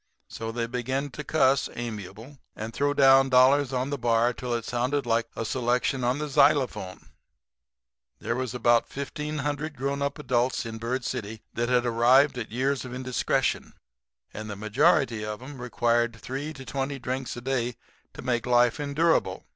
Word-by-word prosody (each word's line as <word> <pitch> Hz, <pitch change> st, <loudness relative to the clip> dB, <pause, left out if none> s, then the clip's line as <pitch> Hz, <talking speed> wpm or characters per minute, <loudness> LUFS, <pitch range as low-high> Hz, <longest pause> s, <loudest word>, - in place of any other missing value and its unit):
So 115 Hz, 0 st, -6 dB
they 115 Hz, 0 st, -2 dB
began 130 Hz, +4 st, -3 dB
to 150 Hz, -, -7 dB
cuss, 135 Hz, -2 st, +2 dB
amiable, 110 Hz, +3 st, -7 dB, 0.2 s
and 110 Hz, +1 st, -6 dB
throw 145 Hz, +3 st, 0 dB
down 135 Hz, -1 st, +6 dB
dollars 130 Hz, +2 st, +5 dB
on 130 Hz, +2 st, -1 dB
the 145 Hz, -, -2 dB
bar 120 Hz, 0 st, +2 dB
till 120 Hz, 0 st, -3 dB
it 115 Hz, -1 st, -4 dB
sounded 125 Hz, +4 st, -1 dB
like 115 Hz, 0 st, +1 dB
a 115 Hz, -, -3 dB
selection 125 Hz, +2 st, 0 dB
on 125 Hz, +2 st, +1 dB
the 150 Hz, +1 st, -3 dB
xylophone. 140 Hz, -9 st, +1 dB, 1.1 s
"There 115 Hz, -, -3 dB
was 125 Hz, -1 st, -3 dB
about 120 Hz, -1 st, +3 dB
1,500 145 Hz, +1 st, -4 dB
grown 140 Hz, +2 st, -2 dB
up 140 Hz, +2 st, -1 dB
adults 125 Hz, -4 st, 0 dB
in 115 Hz, -1 st, -6 dB
Bird 120 Hz, +2 st, -2 dB
City 110 Hz, 0 st, -5 dB
that 120 Hz, +1 st, -1 dB
had 125 Hz, -1 st, +2 dB
arrived 125 Hz, +4 st, +4 dB
at 110 Hz, -, -6 dB
years 130 Hz, +3 st, 0 dB
of 125 Hz, -1 st, -7 dB
indiscretion; 130 Hz, -1 st, -1 dB, 0.6 s
and 110 Hz, 0 st, -7 dB
the 100 Hz, -, -5 dB
majority 110 Hz, +2 st, +2 dB
of 105 Hz, 0 st, -4 dB
'em 130 Hz, 0 st, -10 dB
required 120 Hz, -1 st, +1 dB
from -, -, -17 dB
three 140 Hz, +4 st, -4 dB
to 135 Hz, -2 st, -10 dB
twenty 135 Hz, +1 st, -3 dB
drinks 130 Hz, 0 st, -4 dB
a -, -, -6 dB
day 125 Hz, -2 st, -1 dB, 0.4 s
to -, -, -8 dB
make 120 Hz, -1 st, -1 dB
life 120 Hz, +3 st, +3 dB
endurable. 145 Hz, -, +1 dB
125 Hz, 170 wpm, -26 LUFS, 115-140 Hz, 1.1 s, down